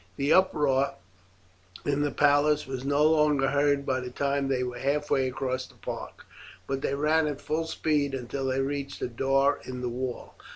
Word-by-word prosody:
The 140 +3 +2
uproar 145 -7 +3 0.9
in 145 0 +1
the 145 - +1
palace 145 +1 +3
was 130 -1 -5
no 145 +2 +2
longer 150 -3 +3
heard 140 0 +2
by 130 -1 0
the 125 -1 -5
time 140 +2 -1
they 130 -2 0
were 125 -1 -5
halfway 140 -1 +1
across 130 0 -3
the - - -20
park; - - -7 0.4
but 135 +3 -3
they 140 - -1
ran 155 +2 +2
at 145 -2 -3
full 160 +1 -2
speed 150 -4 0
until 135 +2 -4
they 130 +1 0
reached 140 0 -4
a - - 0
door 135 +3 +1
in 125 -1 -6
the 125 - -2
wall. 125 +1 -5
140 Hz, 180 wpm, -27 LUFS, 130-145 Hz, 0.9 s, uproar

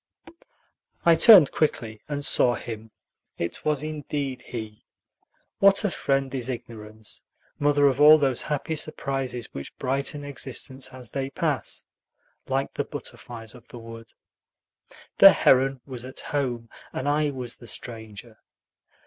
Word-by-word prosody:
I 170 - +7
turned 175 - +8
quickly 115 -8 -1
and 145 -1 -1
saw 120 -1 +5
him. 110 -1 -7 0.5
It 85 - -4
was 150 -2 0
indeed 145 -4 -4
he. 110 -4 -8 0.7
What 195 +2 +5
a 205 - +1
friend 135 -3 -1
is 130 -2 -3
ignorance, 110 -3 -7 0.4
mother 145 0 +3
of 140 0 +2
all 155 +1 +9
those 135 -5 +1
happy 150 +2 -3
surprises 135 -5 -3
which 70 - -8
brighten 140 +2 -2
existence 135 -1 -5
as 125 -3 -10
they 135 -1 -3
pass, 135 - -2 0.6
like - - -1
the - - -1
butterflies 115 -2 -7
of 125 -2 -16
the - - -11
wood. 115 0 -11 1.1
The - - +10
heron 135 0 +3
was 125 -3 -7
at 130 +1 -9
home, 125 -5 -3 0.2
and 130 - -4
I 150 +1 +2
was 125 -4 -5
the 120 - -13
stranger. 110 -1 -6
130 Hz, 135 wpm, -25 LUFS, 115-145 Hz, 1.1 s, The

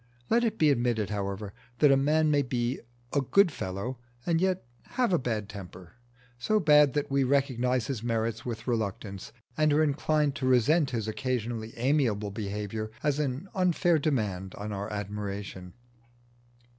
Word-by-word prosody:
Let 235 +1 +4
it 220 -2 0
be 155 -2 +4
admitted, 120 -5 0
however, 100 0 -3 0.2
that 145 +2 +5
a - - +6
man 150 +3 +3
may 145 -1 +4
be 125 -1 -1 0.3
"a 140 - +3
good 190 +7 +4
fellow" 100 +3 -4 0.3
and 165 -1 +1
yet 185 -6 0 0.3
have 245 -6 +2
a 175 - +4
bad 110 -5 -2
temper, 95 -4 -10 0.5
so 215 +12 +2
bad 150 -5 +5
that 145 -1 -1
we 140 0 +3
recognise 130 -2 +1
his 130 -6 -3
merits 115 -1 -1
with 115 -2 -5
reluctance, 100 -4 -3 0.2
and 155 -1 +3
are 150 +2 +4
inclined 150 0 +1
to 130 - -1
resent 135 +5 +4
his 115 -4 -3
occasionally 115 -1 -3
amiable 115 -6 +1
behaviour 105 +1 -4
as 150 -1 +1
an 140 +4 -2
unfair 175 -3 +2
demand 105 -11 -1
on 105 +1 -5
our 100 +1 -4
admiration. 100 -3 -5
125 Hz, 155 wpm, -28 LUFS, 105-150 Hz, 0.5 s, a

